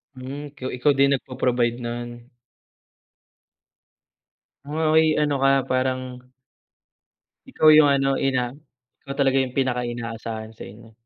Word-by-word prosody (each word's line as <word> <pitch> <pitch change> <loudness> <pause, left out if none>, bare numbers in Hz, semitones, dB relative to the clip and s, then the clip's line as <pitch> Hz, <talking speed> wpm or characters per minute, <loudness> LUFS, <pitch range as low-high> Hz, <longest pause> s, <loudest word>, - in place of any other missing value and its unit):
Hmm, 130 +3 -7 0.2
ko - - -12
ikaw 145 +4 +3
din 140 0 +4
nagpo-provide 125 -3 -1
no'n? 120 0 -5 2.6
Oh, 155 +1 +1
ay, 160 -1 +4
ano 145 -2 +1
ka 135 0 +3
parang 130 0 -1 1.3
Ikaw 155 - +1
'yung 155 -1 +7
ano, 135 -1 +1
ina, 125 -3 0 0.5
ikaw 140 0 -7
talaga 135 -1 +2
'yung 130 -1 -2
pinaka-inaasahan 120 -3 -3
sa 110 - -12
inyo. 115 +3 -15
130 Hz, 115 wpm, -23 LUFS, 120-140 Hz, 2.6 s, yung